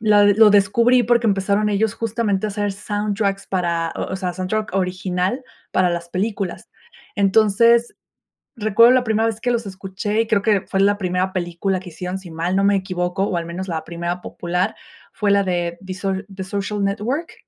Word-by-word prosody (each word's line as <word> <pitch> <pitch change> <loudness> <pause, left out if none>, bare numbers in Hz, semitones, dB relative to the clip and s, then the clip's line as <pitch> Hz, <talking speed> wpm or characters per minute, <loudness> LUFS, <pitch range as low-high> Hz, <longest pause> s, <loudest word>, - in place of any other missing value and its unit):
la 210 -2 +5
lo 210 +1 +6
descubrí, 230 +5 +4
porque, 235 0 +2
empezaron 200 +1 +1
ellos, 210 +1 0
justamente, 215 -3 -1
a - - -3
hacer 205 0 -1
soundtracks 205 -1 -2
para 170 -3 -1
o - - -4
o - - -1
sea, 185 -2 -3
soundtrack 190 +3 -3
original 185 +5 -1 0.3
para 180 -1 +3
las 170 0 -4
películas. 195 0 -3 0.5
Entonces, 220 +4 +3 0.6
recuerdo 225 +2 +5
la 255 - +3
primera 220 +1 +1
vez 225 -1 -3
que 245 - 0
los 235 -2 -1
escuché 195 +2 -2
y 225 - -2
creo 210 -2 +2
que 205 -3 +2
fue 195 - -3
en - - +5
la 205 - +1
primera 185 -1 -1
película 185 +1 -2
que 180 0 -10
hicieron, 180 +3 -5
si 190 -2 -11
mal 170 +3 -2
no 195 - +2
me 200 0 +4
equivoco, 185 0 -2
o, 185 -3 -1
al 170 - -3
menos, 180 +3 -5
la 160 -2 -3
primera 170 +1 -4
popular 180 +4 -2 0.4
fue 205 -2 0
la 200 0 +4
de 175 -2 -2
The 185 - -5
So 195 +1 -2 0.2
The 190 -1 -5
Social 200 +1 -3
Network, 230 - -2
195 Hz, 190 wpm, -21 LUFS, 185-215 Hz, 0.6 s, lo